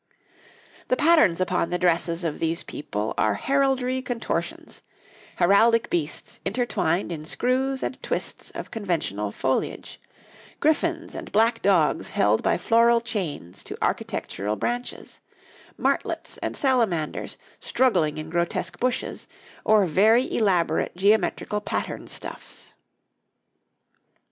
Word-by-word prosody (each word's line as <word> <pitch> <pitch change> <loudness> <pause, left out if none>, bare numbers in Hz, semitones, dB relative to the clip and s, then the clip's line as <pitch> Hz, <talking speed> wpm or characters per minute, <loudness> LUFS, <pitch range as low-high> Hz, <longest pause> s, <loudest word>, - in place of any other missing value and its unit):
The - - +2
patterns 300 - +4
upon 180 -2 0
the 180 - 0
dresses 170 -1 +1
of 160 -3 -2
these 165 0 0
people 105 -6 -4
are 110 - +2
heraldry 265 -2 +1
contortions 245 -2 -4 0.5
heraldic 225 +6 +4
beasts 155 -3 -3
intertwined 195 -7 0
in 155 -3 -5
screws 260 +9 0
and 260 - -4
twists - - -3
of - - -6
conventional 160 - -2
foliage, 130 +5 -2 0.6
griffins 325 +2 +1
and - - -7
black 225 +3 +3
dogs 185 -6 +2
held 105 +2 +2
by - - +2
floral 235 +4 +4
chains 180 - -4
to - - -7
architectural 105 +3 -2
branches, 245 - -4 0.6
martlets - - -1
and - - -4
salamanders 225 - 0 0.2
struggling 180 -14 +1
in 155 +1 -6
grotesque 175 +1 -2
bushes, 250 0 -2 0.4
or 215 -2 +5
very 220 - +3
elaborate 185 -8 +1
geometrical 210 +2 +1
patterned - - -4
stuffs. - - -8
195 Hz, 110 wpm, -25 LUFS, 165-245 Hz, 0.6 s, or